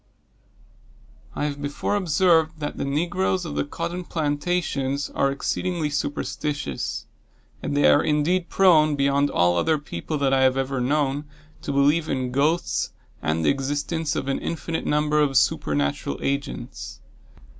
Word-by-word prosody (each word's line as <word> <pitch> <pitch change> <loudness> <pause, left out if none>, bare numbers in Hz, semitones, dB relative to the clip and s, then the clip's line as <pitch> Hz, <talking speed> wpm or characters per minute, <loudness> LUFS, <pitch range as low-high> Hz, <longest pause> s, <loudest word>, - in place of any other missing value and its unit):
I 145 - -1
have 145 -1 -3
before 145 +7 -2
observed 165 -3 +2
that 145 -1 -4
the - - -2
negroes 175 +5 0
of 155 - -5
the - - 0
cotton 175 +5 -4
plantations 145 -3 -1
are 140 - +1
exceedingly 160 +2 -2
superstitious; 145 - -3 0.6
and 145 - -2
they 145 - +4
are 145 - +5
indeed 165 +4 +1
prone, 155 -6 +5
beyond 140 0 +2
all 90 0 +2
other 160 - +2
people 145 - -5
that 140 -1 +1
I 135 - +4
have 130 0 +4
ever 135 -1 -1
known, 145 +2 0 0.4
to - - -3
believe 145 +4 +2
in 130 -2 -1
ghosts, 150 +6 0 0.3
and 80 +1 0
the - - +5
existence 145 +3 -2
of 130 - -2
an 135 - 0
infinite 165 0 -3
number 150 0 +2
of 140 -3 +3
supernatural 70 -9 +1
agents. 140 0 -4
145 Hz, 145 wpm, -24 LUFS, 135-160 Hz, 0.6 s, are